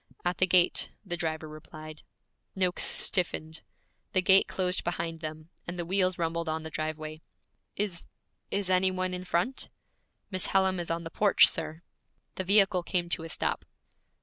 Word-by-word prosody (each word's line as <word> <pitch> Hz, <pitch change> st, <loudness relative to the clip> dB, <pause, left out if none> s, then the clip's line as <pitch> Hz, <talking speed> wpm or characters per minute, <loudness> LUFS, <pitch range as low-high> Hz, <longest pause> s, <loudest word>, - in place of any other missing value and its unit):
'At 175 Hz, 0 st, -1 dB
the 185 Hz, -, +4 dB
gate,' 180 Hz, -1 st, +3 dB, 0.2 s
the 175 Hz, -3 st, -1 dB
driver 160 Hz, -2 st, -3 dB
replied. 155 Hz, 0 st, -11 dB, 0.5 s
Noakes 185 Hz, -2 st, +1 dB
stiffened. 160 Hz, -3 st, +1 dB, 0.5 s
The 185 Hz, -, +3 dB
gate 190 Hz, +1 st, +6 dB
closed 185 Hz, 0 st, -1 dB
behind 170 Hz, -1 st, -3 dB
them, 155 Hz, +1 st, -7 dB, 0.2 s
and 175 Hz, +1 st, -5 dB
the 175 Hz, -, -3 dB
wheels 185 Hz, 0 st, +1 dB
rumbled 165 Hz, 0 st, -2 dB
on 160 Hz, 0 st, -2 dB
the 160 Hz, -, -6 dB
driveway. 155 Hz, 0 st, -4 dB, 0.5 s
'Is 200 Hz, -4 st, -3 dB, 0.4 s
is 200 Hz, -2 st, -1 dB
any 185 Hz, +1 st, +5 dB
one 185 Hz, 0 st, -2 dB
in 180 Hz, 0 st, -5 dB
front?' 185 Hz, +10 st, -1 dB, 0.6 s
'Miss 185 Hz, -1 st, +1 dB
Hallam 190 Hz, -1 st, +2 dB
is 170 Hz, -, -4 dB
on 165 Hz, 0 st, -2 dB
the 165 Hz, -, -7 dB
porch, 205 Hz, +2 st, +6 dB
sir.' 160 Hz, +1 st, -4 dB, 0.5 s
The 185 Hz, -, -4 dB
vehicle 195 Hz, -1 st, +4 dB
came 175 Hz, -1 st, -1 dB
to 170 Hz, -, +1 dB
a -, -, -7 dB
stop. -, -, -1 dB
175 Hz, 165 wpm, -29 LUFS, 160-185 Hz, 0.6 s, gate